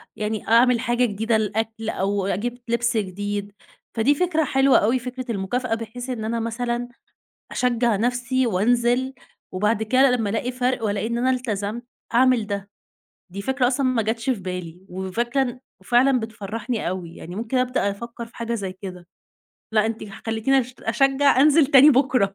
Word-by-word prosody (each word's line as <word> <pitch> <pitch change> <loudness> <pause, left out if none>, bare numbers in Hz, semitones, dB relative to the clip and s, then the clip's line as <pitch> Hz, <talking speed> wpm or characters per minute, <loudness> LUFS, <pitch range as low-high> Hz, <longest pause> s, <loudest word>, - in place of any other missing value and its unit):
يعني 215 0 -3
أعمل 235 +1 +5
حاجة 240 +1 +1
جديدة 220 +1 0
للأكل، 220 +1 -2
أو 200 -1 -1
أجيب 235 +6 -2
لبس 235 0 +1
جديد، 205 +1 -3 0.5
فدي 270 +6 +3
فكرة 320 -1 +1
حلوة 270 0 +4
أوي، 235 +5 +2
فكرة 255 +1 -6
المُكافأة، 225 +4 -1
بحيث 230 +3 -7
إن 230 -4 -3
أنا 230 +1 -1
مثلًا 235 +1 -2 0.7
أشجع 240 -3 +1
نفسي 245 +3 0
وأنزِل، 240 +5 +1 0.4
وبعد 210 +3 +1
كده 260 +4 +4
لمّا 225 -5 0
ألاقي 240 +3 -2
فرق، 250 -2 -1
وألاقي 205 0 -1
إن 235 0 -2
أنا 255 +2 +2
إلتزمت 235 -2 -2 0.3
أعمل 250 -3 +4
ده، 200 -1 -4 0.6
دي 200 - -5
فكرة 265 +3 +1
أصلًا 265 +1 +1
ما 250 -3 +1
جاتش 225 +4 -1
في 235 - -1
بالي، 180 -2 -6
وفكرة 230 +9 -1
إن 250 -1 -4 0.2
وفعلًا 250 +1 +3
بتفرّحني 220 +1 -4
أوي، 175 -2 -5
يعني 175 +3 -9
ممكن 230 +3 -2
أبدأ 250 -5 +1
أفكر 235 +3 -7
في 230 - -20
حاجة 235 0 -3
زي 195 -4 -4
كده 185 -2 -9 0.7
لأ، 215 0 +3
أنتِ 225 0 -3 0.3
خلّيتيني 225 +5 +2
أش 250 +1 -7
أشجع 270 +3 +3
أنزِل 300 +1 +6
تاني 280 +1 +8
بكرة، 250 -7 +2
235 Hz, 165 wpm, -23 LUFS, 210-250 Hz, 0.7 s, تاني